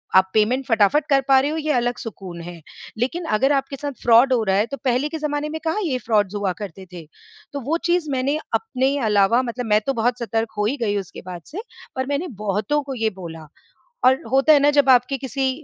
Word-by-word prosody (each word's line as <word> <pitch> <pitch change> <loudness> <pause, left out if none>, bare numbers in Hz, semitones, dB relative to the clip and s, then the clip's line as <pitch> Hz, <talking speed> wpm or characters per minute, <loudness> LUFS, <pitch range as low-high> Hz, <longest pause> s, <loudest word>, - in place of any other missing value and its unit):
आप 190 0 +5
पेमेंट 240 +5 +2
फटाफट 225 +6 +3
कर 275 -1 +4
पा 270 -1 +6
रहे 280 +2 0
हो, 315 - -3
ये 310 -1 -1
अलग 245 0 0
सुकून 185 -6 -8
है। 170 -1 -9 0.4
लेकिन 295 +10 -2
अगर 270 +5 +2
आपके 275 +1 -1
साथ 285 +1 -5
फ्रॉड 240 +3 +5
हो 235 -3 +2
रहा 190 -2 +1
है, 205 - +2
तो 275 +4 -6
पहले 255 +3 +1
के 320 - -4
ज़माने 295 0 -2
में 320 - -5
कहाँ 325 +7 0
ये 285 -8 -1
फ्रॉड्स 210 -3 +1
हुआ 200 -2 -1
करते 190 -1 -8
थे। 170 -3 -9 0.5
तो 285 - -3
वो 300 +7 -1
चीज़ 345 -3 +1
मैंने 270 +3 0 0.2
अपने 275 - 0
अलावा, 210 +3 +3
मतलब 245 0 -4
मैं 210 -1 +3
तो 275 - 0
बहुत 240 +1 0
सतर्क 225 -1 -2
हो 210 - +1
ही 255 +7 -1
गई 205 -2 0
उसके 195 -3 -7
बाद 180 -2 -7
से, 360 +9 -7 0.3
पर 260 0 -1
मैंने 285 +5 -2 0.2
बहुतों 210 +9 0
को 275 -1 -6
ये 225 -2 0
बोला, 165 -3 -8 0.6
और 260 +1 +4
होता 270 +4 +5
है 290 - +6
ना, 290 +1 +4
जब 285 -2 +3
आपके 255 +2 +4
किसी 265 +1 -2
255 Hz, 230 wpm, -22 LUFS, 210-285 Hz, 0.6 s, पा